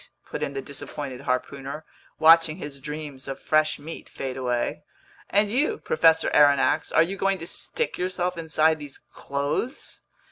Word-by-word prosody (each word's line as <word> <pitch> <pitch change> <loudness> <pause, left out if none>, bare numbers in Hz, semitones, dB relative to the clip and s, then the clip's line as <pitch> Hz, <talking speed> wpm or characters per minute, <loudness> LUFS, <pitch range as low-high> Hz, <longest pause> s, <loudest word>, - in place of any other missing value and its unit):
put - - -6
in 140 - -2
the 135 -1 -4
disappointed 135 -1 -6
harpooner, 140 +3 -3 0.3
watching 165 0 +6
his 145 -5 -8
dreams 150 -2 -6
of 135 - -5
fresh 155 0 +2
meat 160 +3 -9
fade 130 -1 -5
away. 125 -2 -1 0.5
"And 205 +1 +3
you, 280 +7 +1
Professor 160 0 +3
Aronnax, 145 -2 +4
are 165 - +5
you 190 +4 -4
going 195 0 +1
to 165 - -7
stick 470 - -3
yourself 180 0 -1
inside 160 -1 +2
these 145 -2 -9
clothes?" 140 - -4
155 Hz, 150 wpm, -25 LUFS, 140-165 Hz, 0.5 s, watching